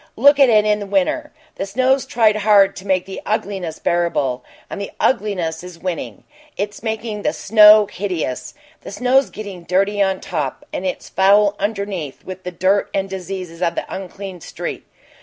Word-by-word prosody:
Look 285 +4 +5
at 275 -2 +7
it 215 -2 +4
in 210 -1 0
winter. 205 - 0 0.3
The 195 - -3
snow's 260 +5 +1
tried 220 -3 +3
hard 200 -2 +4
to 195 - -9
make 185 -1 +1
the 190 - -7
ugliness 195 -6 -3
bearable, 170 -7 0 0.2
but - - -7
the 200 - -4
ugliness 185 -9 0
is 180 -2 -10
winning; 180 -1 -5 0.3
it's 205 0 -4
making 220 -1 -3
the - - 0
snow 210 0 +7
hideous; 170 -11 -4 0.3
the - - -9
snow's 255 +5 +2
getting 200 -4 -8
dirty 195 +4 +1
on 190 -1 +1
top, 150 -6 -4
and 190 - -2
it's 180 - -4
foul 200 +1 +4
underneath 200 -8 -4
with 185 0 -7
the 180 - -5
dirt 190 +3 +1
and 195 0 -1
disease 185 -2 -6
of 170 -2 0
the - - -3
unclean 190 -1 -7
street. - - -6
195 Hz, 170 wpm, -19 LUFS, 180-210 Hz, 0.3 s, at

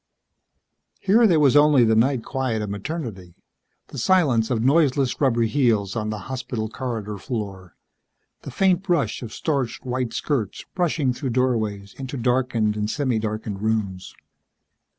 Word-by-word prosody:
Here 225 +4 +4
there 170 -5 +4
was 140 -2 +4
only 145 -3 +6
the 110 - +3
night 120 +2 +2
quiet 125 -5 -2
of 105 - -4
Maternity, 100 - -6 0.5
the 140 - -6
silence 130 -8 +3
of 115 -3 0
noiseless 140 -2 +2
rubber 120 -4 +3
heels 115 -5 +1
on 110 -1 -2
the 110 -1 -4
hospital 125 -4 -4
corridor 110 -4 -5
floor, 100 -6 -6 0.7
the - - -8
faint 190 -2 +2
brush 175 -6 0
of 115 -3 -7
starched 135 -3 -2
white 125 -1 -2
skirts 120 -5 -2
brushing 160 -7 0
through 130 +2 -4
doorways 110 -6 -1
into 135 +1 -5
darkened 120 -3 +1
and 105 0 -2
semi 130 -3 0
darkened 110 -2 -4
rooms. 105 -4 -2
120 Hz, 145 wpm, -23 LUFS, 110-140 Hz, 0.7 s, only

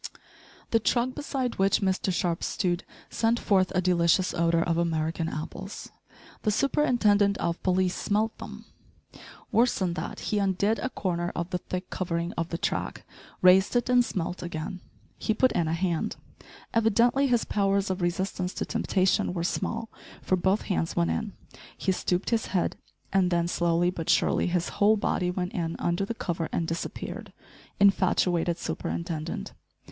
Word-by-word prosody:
The 225 - +4
truck 240 +3 +1
beside 260 -6 -3
which 195 0 +3
Mr 190 0 +1
Sharp 175 -2 -1
stood 175 -1 -1 0.3
sent 230 +1 +2
forth 190 -2 +2
a 185 - +3
delicious 180 0 +3
odour 170 -1 +2
of 170 -1 0
American 165 0 -1
apples. 155 +2 -7 0.5
The 215 - +1
superintendent 210 -5 +3
of 170 0 -2
police 185 -1 +1
smelt 215 +2 0
them. - - -9 0.9
Worse 240 +2 +3
than 180 -3 0
that - - -5
he 210 - 0
undid 200 +3 +1
a 255 - -2
corner 175 -6 -2
of 170 +2 -3
the 180 - -1
thick 180 +1 -6
covering 170 -1 -2
of 165 0 -3
the 165 - -2
track, 200 - -3 0.4
raised 190 +4 +6
it 245 +1 +1
and 250 -1 +6
smelt 180 -5 -3
again 175 +1 -5 0.4
he 220 - 0
put 255 +3 +3
in 170 - 0
a 160 - 0
hand. 170 -1 -1 0.6
Evidently 235 +5 +3
his 240 -3 +2
powers 195 -1 +1
of 185 0 -3
resistance 180 +1 -1
to - - -2
temptation 190 -4 +1
were 170 - -1
small, 225 +5 -2 0.4
for 185 - +2
both 190 +3 +1
hands 175 -4 -1
went 85 -1 +2
in 80 - -3 0.4
he - - 0
stooped 180 +2 -1
his 230 -1 +1
head, 180 -3 0 0.4
and 190 -2 +3
then, 170 -1 +1
slowly 175 0 +1
but 165 -3 -5
surely, - - +3
his 175 -1 0
whole 215 +2 +3
body 180 -3 0
went 180 0 -3
in 165 -2 -2
under 175 +3 0
the 230 - -4
cover 170 -5 -3
and 165 - -1
disappeared. 165 +1 -5 0.5
Infatuated 180 -3 +3
superintendent! 165 - -4
185 Hz, 160 wpm, -27 LUFS, 170-205 Hz, 0.9 s, raised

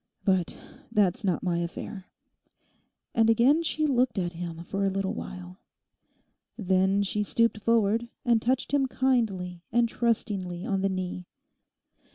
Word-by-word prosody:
'But 185 -4 +1 0.3
that's 210 0 +2
not 185 -4 0
my 175 -2 0
affair.' 180 +3 -6 1.1
And 225 -1 +3
again 250 +8 +4
she 310 -1 0
looked 255 -5 +1
at 175 -2 -1
him 170 -1 -6
for 195 +3 -3
a 195 - +3
little 195 +1 -1
while. 185 -4 -8 1.0
Then 190 -1 +2
she 210 +1 -1
stooped 230 +1 +1
forward 230 +1 +2 0.2
and 235 -2 +3
touched 255 +3 0
him 275 -2 +3
kindly 215 -10 0
and 240 0 +3
trustingly 200 -7 -1
on 195 -1 0
the 195 - +1
knee. 180 -1 -4
200 Hz, 140 wpm, -27 LUFS, 185-235 Hz, 1.1 s, again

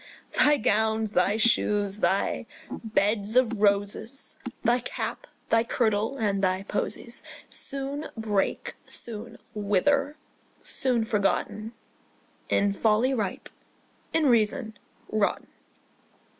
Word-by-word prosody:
Thy 295 0 +5
gowns, 220 -1 +1
thy 190 +4 +3
shoes, 210 -3 +2
thy 200 +2 +1 0.2
beds 210 0 0
of 235 -4 +3
roses, 205 +5 0 0.2
Thy 240 +1 +3
cap, 240 - -4 0.2
thy 225 0 +5
kirtle, 225 +1 0
and 200 -4 0
thy 185 0 +1
posies 235 +4 -4 0.3
Soon 275 +2 -4
break, 210 -3 -1
soon 230 0 -7 0.2
wither, 275 +9 +1 0.5
soon 245 -4 +1
forgotten, 215 +1 0 0.8
In 200 0 +3
folly 220 +5 +2
ripe, 210 -7 -3 0.6
in 325 -1 +2
reason 230 -1 +2 0.4
rotten. 215 -2 +1
220 Hz, 100 wpm, -27 LUFS, 205-240 Hz, 0.8 s, Thy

